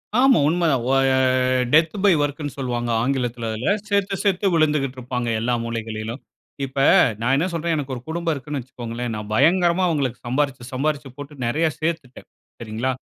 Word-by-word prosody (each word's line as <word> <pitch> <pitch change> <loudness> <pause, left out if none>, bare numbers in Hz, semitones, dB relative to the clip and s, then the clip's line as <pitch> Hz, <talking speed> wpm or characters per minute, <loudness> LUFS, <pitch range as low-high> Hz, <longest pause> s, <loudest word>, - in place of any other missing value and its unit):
ஆமா 260 +1 +5
உண்ம 170 +2 +1
தான். 130 -4 0
ஓ - - +2 0.2
ய 135 - +3 0.6
டெத் 160 +1 +4
பை 200 - +6
ஒர்க்குன்னு 145 0 -3
சொல்வாங்க 120 -3 -2
ஆங்கிலத்துல, 125 -3 -1
அதுல. 110 - 0 0.2
செத்து, 200 -1 +1
செத்து 195 0 +1
விழுந்துக்கிட்டு 150 -5 +1
இருப்பாங்க. 125 -1 -3
எல்லா 120 +2 0
மூளைகளிலும். 115 +1 -5 0.4
இப்ப, 135 +1 -12 0.4
நான் 125 +3 +2
என்ன 165 - +1
சொல்றேன், 165 0 -1
எனக்கு 140 -3 -3
ஒரு 120 - -7
குடும்பம் 170 0 -1
இருக்குன்னு 145 +1 -5
வச்சிக்கோங்களேன். 120 -1 -6
நான் 105 0 -6
பயங்கரமா 170 +7 +3
அவுங்களுக்கு 140 -7 -1
சம்பாரிச்சு, 130 -1 -1
சம்பாரிச்சு 140 0 -2
போட்டு 145 +1 -9
நெறையா 155 +7 +1
சேத்துட்டேன். 155 -6 -4 0.3
சரிங்களா? 115 +3 -2
135 Hz, 160 wpm, -22 LUFS, 120-160 Hz, 0.6 s, பை